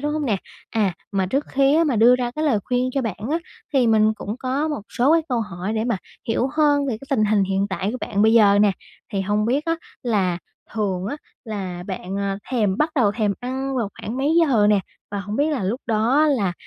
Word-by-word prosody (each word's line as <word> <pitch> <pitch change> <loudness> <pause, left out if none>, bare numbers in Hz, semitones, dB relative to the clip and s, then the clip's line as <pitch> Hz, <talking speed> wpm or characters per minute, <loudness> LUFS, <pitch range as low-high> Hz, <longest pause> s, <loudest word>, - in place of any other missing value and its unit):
đúng 295 +1 -1
hông 310 -1 -1
nè? 215 -5 +2 0.3
À, 210 -5 +1 0.2
mà 190 -1 +1
trước 275 +9 0
khi 275 +1 +3
á 330 - +4
mà 275 -6 +1
đưa 240 +3 +6
ra 245 -1 -2
cái 305 +5 -3
lời 270 -8 +3
khuyên 250 0 0
cho 275 - +1
bạn 225 -6 -3
á, 325 - +1 0.3
thì 265 -4 +3
mình 220 -1 +4
cũng 210 +1 -5
có 265 +4 -1
một 295 -8 -3
số 265 +6 +2
cái 330 - +4
câu 245 -2 0
hỏi 195 -1 -4
để 220 0 -1
mà 235 -4 0 0.3
hiểu 240 +3 +1
hơn 290 -2 +3
về 245 -5 -1
cái 275 - -12
tình 220 -6 +3
hình 210 -1 +3
hiện 195 +1 0
tại 195 +1 -1
của - - -3
bạn 205 0 0
bây 220 +1 +5
giờ 205 -3 +6
nè. 205 -1 +4 0.4
Thì 195 - 0
hông 210 +2 0
biết 275 +6 +1
á 330 0 0 0.3
là 195 -7 +1 0.4
thường 195 -4 -1
á 285 - -3 0.3
là 190 -6 -5
bạn, 190 -1 -5
ờ, 200 -1 -2
thèm 210 -7 +1
bắt 305 +2 +2
đầu 215 -7 +3
thèm 210 -3 0
ăn 265 +2 -3
vào 230 -5 0
khoảng 225 - -5
mấy 285 +5 +1
giờ 250 -10 +4
nè? 205 -1 +4 0.3
Và 205 -1 -3
hổng 205 +2 -5
biết 295 +2 +2
là 270 -10 -1
lúc 225 +8 -2
đó 235 +7 +3
là, 225 -11 +1
225 Hz, 245 wpm, -22 LUFS, 205-270 Hz, 0.4 s, đưa